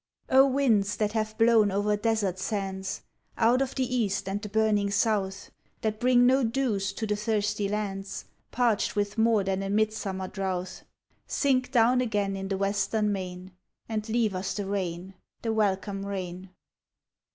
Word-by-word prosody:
WINDS 260 Hz, -6 st, +4 dB
that 210 Hz, -1 st, 0 dB
have 215 Hz, 0 st, -2 dB
blown 225 Hz, -2 st, +5 dB
over 205 Hz, +2 st, +1 dB
desert 205 Hz, -3 st, 0 dB
sands, 190 Hz, -2 st, -3 dB, 0.3 s
Out 240 Hz, +3 st, +4 dB
of 270 Hz, -1 st, -2 dB
the 265 Hz, -, +1 dB
east 200 Hz, -4 st, 0 dB
and 200 Hz, +2 st, -2 dB
the 210 Hz, -, -6 dB
burning 210 Hz, -1 st, +2 dB
south, 200 Hz, -2 st, 0 dB, 0.3 s
That 215 Hz, -1 st, -2 dB
bring 245 Hz, 0 st, +4 dB
no 260 Hz, +2 st, +4 dB
dews 225 Hz, -5 st, 0 dB
to 220 Hz, -, -3 dB
the 210 Hz, -1 st, 0 dB
thirsty 210 Hz, -1 st, -1 dB
lands 195 Hz, -2 st, -4 dB, 0.2 s
Parched 235 Hz, -4 st, +1 dB
with 205 Hz, +1 st, -1 dB
more 220 Hz, -2 st, +4 dB
than 190 Hz, 0 st, -1 dB
a 195 Hz, -, -3 dB
midsummer 205 Hz, -2 st, -1 dB
drouth, 185 Hz, -1 st, -4 dB, 0.5 s
Sink 255 Hz, -3 st, +1 dB
down 250 Hz, 0 st, +4 dB
again 205 Hz, -5 st, -1 dB
in 195 Hz, 0 st, -4 dB
the 195 Hz, 0 st, -2 dB
western 200 Hz, +2 st, 0 dB
main, 185 Hz, -1 st, -5 dB, 0.4 s
And 220 Hz, 0 st, -3 dB
leave 220 Hz, -2 st, +1 dB
us 185 Hz, +1 st, -3 dB
the 205 Hz, -, -3 dB
rain— 190 Hz, -2 st, -3 dB, 0.3 s
the 225 Hz, -1 st, 0 dB
welcome 195 Hz, -2 st, 0 dB
rain. 185 Hz, -2 st, -5 dB
205 Hz, 155 wpm, -27 LUFS, 195-225 Hz, 0.5 s, blown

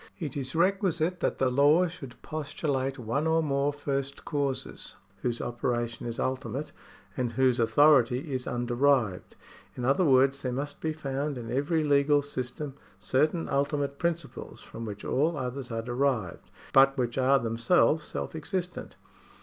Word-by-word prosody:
It 155 Hz, -7 st, -5 dB
is 135 Hz, -1 st, -4 dB
requisite 180 Hz, -1 st, +1 dB
that -, -, 0 dB
the 130 Hz, -1 st, +1 dB
law 145 Hz, +7 st, +5 dB
should 160 Hz, -8 st, -8 dB
postulate 145 Hz, -3 st, -2 dB
one 125 Hz, +6 st, -1 dB
or 160 Hz, 0 st, +2 dB
more 140 Hz, -1 st, +1 dB
first 140 Hz, -1 st, -4 dB
causes, 140 Hz, -3 st, -3 dB, 0.3 s
whose 120 Hz, -1 st, -1 dB
operation 120 Hz, -1 st, -2 dB
is 115 Hz, -, -4 dB
ultimate, 130 Hz, +3 st, -3 dB, 0.4 s
and 120 Hz, -2 st, -2 dB
whose 130 Hz, 0 st, +2 dB
authority 135 Hz, +2 st, +4 dB
is 130 Hz, -1 st, -3 dB
underived. 120 Hz, -4 st, +1 dB, 0.4 s
In 125 Hz, -, -4 dB
other 135 Hz, +8 st, +3 dB
words 135 Hz, -2 st, +4 dB
there 130 Hz, -, -2 dB
must 140 Hz, +3 st, -4 dB
be 160 Hz, -, -1 dB
found 145 Hz, -2 st, -3 dB
in 115 Hz, -2 st, -7 dB
everj^ 150 Hz, +5 st, 0 dB
legal 145 Hz, 0 st, +4 dB
system 135 Hz, +1 st, -5 dB, 0.2 s
certain 150 Hz, -, +1 dB
ultimate 140 Hz, 0 st, -1 dB
principles, 170 Hz, -3 st, -3 dB
from 115 Hz, -, -8 dB
which 105 Hz, -1 st, -7 dB
all 155 Hz, +4 st, +1 dB
others 130 Hz, 0 st, -4 dB
are 115 Hz, -1 st, -3 dB
derived, 120 Hz, -5 st, -1 dB, 0.2 s
but 135 Hz, +1 st, +6 dB
which 120 Hz, 0 st, -1 dB
are 135 Hz, +1 st, +5 dB
themselves 120 Hz, +7 st, +2 dB
self -, -, -5 dB
existent. 175 Hz, +2 st, -4 dB
140 Hz, 150 wpm, -28 LUFS, 125-150 Hz, 0.4 s, but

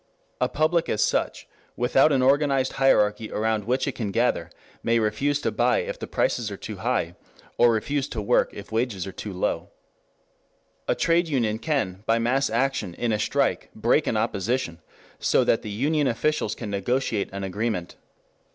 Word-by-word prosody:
A -, -, +1 dB
public 160 Hz, +2 st, +1 dB
as 105 Hz, -, +2 dB
such, -, -, -1 dB, 0.3 s
without 135 Hz, +5 st, +3 dB
an 135 Hz, -2 st, +2 dB
organized 135 Hz, -1 st, +3 dB
hierarchy 105 Hz, -4 st, +3 dB
around 110 Hz, -1 st, 0 dB
which 130 Hz, +5 st, 0 dB
it -, -, +1 dB
can 110 Hz, -5 st, -3 dB
gather, 115 Hz, +5 st, 0 dB, 0.3 s
may 115 Hz, 0 st, +2 dB
refuse 125 Hz, +7 st, +1 dB
to -, -, 0 dB
buy -, -, +2 dB
if -, -, -5 dB
the -, -, -5 dB
prices -, -, 0 dB
are -, -, -6 dB
too -, -, -7 dB
high, -, -, -1 dB, 0.5 s
or 120 Hz, -, +6 dB
refuse 135 Hz, +5 st, -1 dB
to 120 Hz, -, -5 dB
work 105 Hz, +4 st, +2 dB
if 100 Hz, +1 st, -10 dB
wages 110 Hz, -5 st, -1 dB
are 95 Hz, -, -6 dB
too 105 Hz, -, -7 dB
low. 90 Hz, -, -2 dB, 1.2 s
A -, -, +2 dB
trade 170 Hz, +1 st, +2 dB
union 115 Hz, -7 st, 0 dB
can 115 Hz, -, -1 dB
by 115 Hz, -, +3 dB
mass 130 Hz, +4 st, +1 dB
action 115 Hz, -6 st, -1 dB
in 120 Hz, -1 st, -1 dB
a 105 Hz, -, 0 dB
strike 140 Hz, +6 st, 0 dB
break 120 Hz, +7 st, +2 dB
an 110 Hz, -, +1 dB
opposition 105 Hz, -4 st, -1 dB, 0.4 s
so -, -, +3 dB
that 115 Hz, -, +2 dB
the 105 Hz, -, -7 dB
union 145 Hz, +7 st, +1 dB
officials 125 Hz, -1 st, 0 dB
can 110 Hz, -4 st, -6 dB
negotiate 110 Hz, +1 st, -1 dB
an 100 Hz, 0 st, -5 dB
agreement. 95 Hz, -2 st, -3 dB
115 Hz, 175 wpm, -25 LUFS, 105-135 Hz, 1.2 s, or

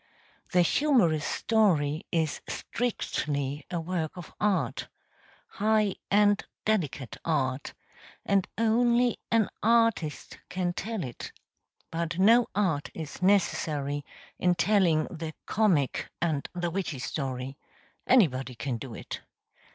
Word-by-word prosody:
The 180 Hz, -, +5 dB
humorous 180 Hz, -, +3 dB
story 170 Hz, -8 st, +1 dB
is 160 Hz, -3 st, 0 dB
strictly 150 Hz, -, -2 dB
a 175 Hz, -2 st, -2 dB
work 165 Hz, 0 st, -3 dB
of 175 Hz, -, -9 dB
art 175 Hz, -, 0 dB, 0.6 s
high 215 Hz, -2 st, +1 dB
and 205 Hz, 0 st, +4 dB, 0.2 s
delicate 145 Hz, -, -1 dB
art 135 Hz, -4 st, -1 dB, 0.5 s
and 195 Hz, -2 st, +2 dB
only 235 Hz, +2 st, +3 dB
an 225 Hz, -3 st, +3 dB
artist 230 Hz, -9 st, +1 dB
can 180 Hz, -1 st, -1 dB
tell 215 Hz, +2 st, -3 dB
it; 125 Hz, -3 st, -7 dB, 0.6 s
but 170 Hz, 0 st, -2 dB
no 230 Hz, +5 st, +6 dB
art 180 Hz, -8 st, +1 dB
is 160 Hz, +1 st, -7 dB
necessary 150 Hz, -7 st, +1 dB, 0.4 s
in 180 Hz, -1 st, +3 dB
telling 180 Hz, -6 st, +3 dB
the 160 Hz, -2 st, -6 dB
comic 180 Hz, -11 st, +1 dB
and 155 Hz, -4 st, -1 dB
the 175 Hz, -1 st, -1 dB
witty 180 Hz, -5 st, -2 dB
story; 130 Hz, 0 st, -4 dB, 0.5 s
anybody 135 Hz, -, +3 dB
can 120 Hz, +1 st, -3 dB
do 120 Hz, -1 st, -8 dB
it. -, -, -7 dB
175 Hz, 110 wpm, -28 LUFS, 145-210 Hz, 0.6 s, no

